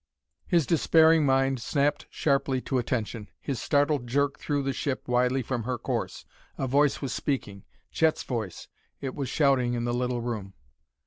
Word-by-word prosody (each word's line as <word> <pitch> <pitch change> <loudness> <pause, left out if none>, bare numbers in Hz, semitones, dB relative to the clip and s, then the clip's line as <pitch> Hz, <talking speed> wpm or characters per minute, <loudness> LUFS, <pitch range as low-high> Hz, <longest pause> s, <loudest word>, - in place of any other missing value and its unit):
His 170 -4 +3
despairing 160 0 +4
mind 135 -1 +2
snapped 145 +3 0
sharply 140 -2 +1
to 130 0 -1
attention. 115 -3 -3
His 135 -4 -4
startled 145 -3 +1
jerk 140 +3 0
threw 145 -2 -1
the 135 0 -1
ship 130 0 -3
widely 125 +1 +2
from 120 0 -2
her 125 +2 -2
course. - - -3 0.3
A - - -1
voice 140 +2 +2
was 130 - -2
speaking 105 -9 -3 0.3
Chet's 160 -1 +2
voice! 110 -8 -4 0.3
It 135 -2 -4
was 135 -3 -4
shouting 130 -5 +2
in 120 - -2
the 120 - -1
little 125 0 -1
room! 110 -5 -5
130 Hz, 165 wpm, -27 LUFS, 120-145 Hz, 0.3 s, despairing